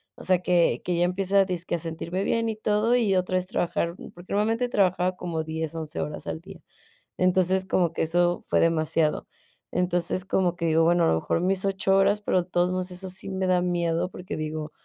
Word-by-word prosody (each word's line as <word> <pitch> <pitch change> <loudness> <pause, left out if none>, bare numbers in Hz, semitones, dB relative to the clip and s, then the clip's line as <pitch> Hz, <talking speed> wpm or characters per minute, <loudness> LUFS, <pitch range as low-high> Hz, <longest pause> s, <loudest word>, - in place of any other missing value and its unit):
o - - -12
sea, 185 -1 +3
que 175 -9 +2
que 180 - 0
ya 175 - +3
empiece 190 +2 -1
a 195 - +7
dizque 180 -2 -3
a 170 - -3
sentirme 170 +4 -4
bien 230 +2 0
y 220 - -2
todo, 215 +2 +2
y 220 -6 +2
otra 185 0 0
vez 185 0 -2
trabajar. 170 -3 -1 0.2
Porque 175 +1 -13
normalmente 225 +4 +1
trabajaba 185 -4 +1
como 165 -3 -3
10, 160 0 -4
11 160 0 -5
horas 150 - -6
al - - -3
día. 190 -2 -13 0.6
Entonces, 185 +1 +2
como 175 -3 +1
que - - -2
eso 175 +2 +1
fue - - +2
demasiado. 160 -1 +1 0.4
Entonces, 180 0 -1
como 180 -2 +1
que 170 - -2
digo: 160 +1 +3
"Bueno, 170 0 +4
a - - +3
lo - - +3
mejor 80 - -1
mis 190 +1 +1
8 195 0 +1
horas". 205 +2 +3
Pero 185 -3 +1
de 180 - -23
todos 175 0 +1
modos 185 0 -2
eso 185 +1 -6
sí 185 +1 -5
me 190 0 -2
da 180 -1 +3
miedo, 175 0 0
porque 180 - -7
digo: 155 0 -4
180 Hz, 220 wpm, -26 LUFS, 170-190 Hz, 0.6 s, a